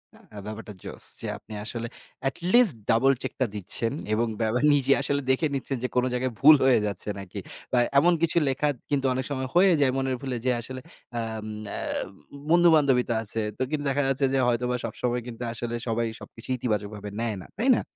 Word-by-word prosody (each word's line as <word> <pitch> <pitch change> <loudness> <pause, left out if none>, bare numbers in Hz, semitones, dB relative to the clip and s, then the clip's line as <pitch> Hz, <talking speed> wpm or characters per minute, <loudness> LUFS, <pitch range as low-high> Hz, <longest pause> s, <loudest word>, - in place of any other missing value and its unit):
আ 105 - -16
ব্যাপারটা 110 0 -7
জোশ। - - -4 0.2
যে - - -5
আপনি - - -12
আসলে 115 +1 -4 0.4
এটলিস্ট 185 - +5 0.2
double 130 +5 +4
check - - -4
টা - - +5
দিচ্ছেন 105 +4 -1 0.2
এবং 115 +2 +1
বেবে 110 +2 +1
নিজে 140 -1 +2
আসলে 140 0 0
দেখে 145 +4 +2
নিচ্ছেন 135 0 -3
যে 125 - +1
কোন 125 - +3
জায়গায় 125 0 -1
ভুল 150 +3 +9
হয়ে 130 -3 +5
যাচ্ছে 105 0 -4
নাকি 95 -2 -7 0.3
বা, 125 - +2 0.2
এমন 175 +4 +4
কিছু 170 0 +2
লেখা 135 +2 +1 0.2
কিন্তু 140 -2 0
অনেক 130 0 -2
সময় 130 -1 -2
হয়ে 185 +2 +6
যায় 140 -2 +3
মনের 135 -1 0
ভুলে 130 -3 -3
যে 130 - +3
আসলে 130 +2 -7 0.4
আম 110 -1 -4 0.3
আ - - -3 0.7
বন্ধু-বান্ধবই 155 -7 +5
তো - - +2
আছে। 110 +1 -3 0.2
তো - - -7
কিন্তু 150 -1 -2
দেখা 140 +1 +1
যাচ্ছে 135 +1 +1
যে 135 - +2
হয়তোবা 125 +1 0
সবসময় 125 0 -2
কিন্তু 120 0 -7
আসলে 120 0 -4
সবাই 115 +1 0
সবকিছু 115 - -12
ইতিবাচকভাবে 105 -3 -3
নেয় 115 -2 -1
না। - - -11
তাই 250 +4 +2
না? - - 0
125 Hz, 195 wpm, -26 LUFS, 115-140 Hz, 0.7 s, ভুল